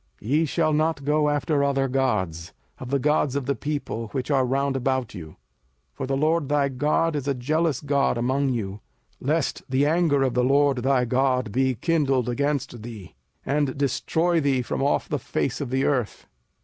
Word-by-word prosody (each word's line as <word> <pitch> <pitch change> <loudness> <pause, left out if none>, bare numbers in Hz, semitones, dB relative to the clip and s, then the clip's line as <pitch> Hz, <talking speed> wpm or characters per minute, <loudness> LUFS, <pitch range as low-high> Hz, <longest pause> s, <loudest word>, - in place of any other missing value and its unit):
05:006:014 110 - -6
Ye 155 +3 +3
shall 155 0 +1
not 155 -2 0
go 150 0 +2
after 145 0 +1
other 135 -1 +1
gods, 105 -11 -1 0.3
of 125 - -7
the 140 - +2
gods 150 0 +1
of 140 -2 -1
the 140 - +1
people 140 -4 -4
which 125 +6 -4
are 135 -2 +2
round 135 +1 0
about 130 -2 -1
you; 85 -6 -8
05:006:015 75 - -16 0.6
(For 135 - -5
the 135 0 0
LORD 155 0 +1
thy 145 -1 +2
God 150 +4 0
is 140 -1 -3
a 140 - +1
jealous 155 +3 0
God 140 -3 +1
among 130 +3 +1
you) 105 -5 -3 0.4
lest 150 +2 -1
the 135 +2 +2
anger 155 -3 +2
of 130 -2 0
the 125 - +2
LORD 140 +1 +3
thy 130 0 +2
God 125 -2 +1
be 130 +3 +1
kindled 135 -3 +1
against 140 -2 -2
thee, 110 -5 -9 0.3
and 140 -1 0
destroy 160 +5 +1
thee 135 -3 +1
from - - -3
off 140 +1 +1
the 145 - -2
face 130 +2 -2
of 140 - -3
the 130 +1 0
earth. 125 -6 -1
135 Hz, 190 wpm, -24 LUFS, 125-145 Hz, 0.6 s, Ye